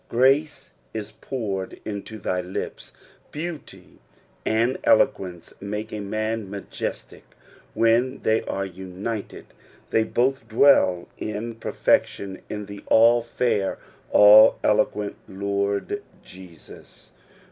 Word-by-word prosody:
"Oraee 135 +3 +2 0.2
u 110 - -2 0.2
poured 100 -8 -4
into 105 +1 -6
thy 90 -2 -2
lipi." 90 +1 -6 0.4
Beauty 160 +1 -8 0.4
and 115 +4 +1
eloquence 95 -10 +1
make 105 +2 -5
a 105 - -4
man 110 +1 -3
miijcstic 100 +1 -6 0.5
when 115 +3 +2
they 110 0 +2
are 95 0 -2
united; 95 +4 -6 0.5
they 110 - +3
both 125 +1 0
dwell 110 -7 +4
In 110 +2 -4
))erfectioa 100 -3 0
in 105 -1 -5
the 100 0 -9
all 115 +2 +5
fair, 115 -4 -1 0.3
all 105 +1 +8
eloquent 105 0 +1
Lord 100 0 -2 0.2
Jesus. 90 -3 -15
110 Hz, 105 wpm, -24 LUFS, 100-115 Hz, 0.5 s, all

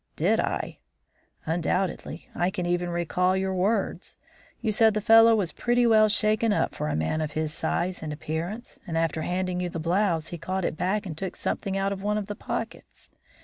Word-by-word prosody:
"Did - - +2
I?" - - -2 0.7
"Undoubtedly; 175 +3 -2
I 175 - +1
can 185 -2 -3
even 175 0 0
recall 180 +2 +1
your 190 0 -1
words. 195 +3 -1 0.4
You 220 - 0
said 220 0 +4
the - - +2
fellow 225 +2 +7
was 195 -6 0
pretty 240 0 +1
well 215 -2 +5
shaken 215 +2 +2
up 205 - +1
for - - -3
a 75 - -1
man 80 - 0
of 155 -1 -3
his 155 -1 -2
size 175 +3 -1
and 155 - -4
appearance, 165 +9 -5
and 165 -2 -2
after 165 -1 0
handing 180 +2 -1
you 180 -1 -1
the 170 - -5
blouse 170 -1 +1
he 175 - -6
caught 185 +3 -2
it - - -1
back 200 +5 -1
and 165 -5 -5
took 185 +3 -5
something 195 -2 -2
out 195 0 0
of 195 - -7
one 210 +1 0
of 210 - -2
the 205 +1 -5
pockets. - - -6
185 Hz, 200 wpm, -26 LUFS, 165-210 Hz, 0.7 s, fellow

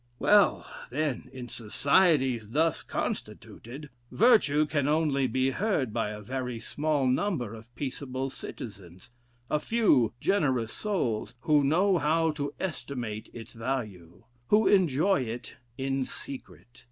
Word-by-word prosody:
Well, 205 +6 +4 0.2
then, 140 -1 -2
in 130 -2 -8
societies 130 - +2
thus 160 +6 +1
constituted, 135 +5 -6 0.2
virtue 205 - +4
can 145 -2 0
only 150 -3 +2
be 130 +2 +1
heard 150 - 0
by 115 -3 -1
a 105 0 -7
very 125 0 -4
small 145 +3 -1
number 130 - 0
of 115 +1 -11
peaceable 135 0 -4
citizens, 95 -4 -9 0.4
a 150 - +1
few 150 - +2
generous 130 - +1
souls, 135 - -2
who 150 -1 +3
know 180 +6 +3
how 160 +1 +2
to 145 -2 -4
estimate 125 - -4
its 115 -1 -10
value, 110 -7 -5 0.2
who 215 +1 +4
enjoy 185 -2 +3
it 120 0 -6 0.2
in 135 0 -1
secret. 120 - -10
135 Hz, 125 wpm, -28 LUFS, 120-155 Hz, 0.4 s, Well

